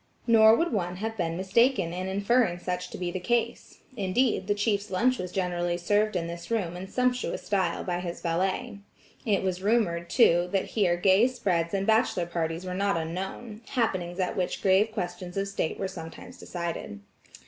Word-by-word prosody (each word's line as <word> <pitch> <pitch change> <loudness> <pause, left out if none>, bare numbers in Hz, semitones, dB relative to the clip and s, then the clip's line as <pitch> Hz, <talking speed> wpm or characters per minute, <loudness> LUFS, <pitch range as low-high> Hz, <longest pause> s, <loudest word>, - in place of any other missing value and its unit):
Nor 220 -1 +7
would 335 +2 0
one 180 -4 -1
have 220 +4 -4
been 170 -4 -2
mistaken 190 -1 +2
in 185 +1 -3
inferring 200 0 +2
such 180 0 -4
to - - -8
be 180 -1 -3
the 185 - -3
case; 235 +5 -2
indeed, 200 0 +1
the 205 - +2
chief's 205 0 0
lunch 250 +7 +1
was 180 -1 -4
generally 175 -2 -1
served 205 +4 +1
in 170 -2 0
this 170 0 -7
room 195 -7 -1
in 185 +2 -6
sumptuous 250 +3 -1
style 190 -5 0
by 175 -1 -2
his 175 -1 -5
valet. 185 +4 -1 0.5
It 200 -3 +2
was 185 -1 -1
rumored, 190 -6 +1
too, 175 -5 +4
that 195 - 0
here 185 -6 +2
gay 190 +6 +5
spreads 195 -9 -1
and 195 0 0
bachelor 220 -5 +2
parties 170 0 -3
were 180 - -4
not 200 -1 +1
unknown; 190 +7 -5
happenings 185 -8 -1
at 185 - -1
which 180 -1 -2
grave 195 +3 +4
questions 180 -1 -5
of 195 0 0
state 195 -5 -2
were 195 - -2
sometimes 165 -3 -10
decided. 170 - -5
190 Hz, 180 wpm, -27 LUFS, 175-215 Hz, 0.5 s, Nor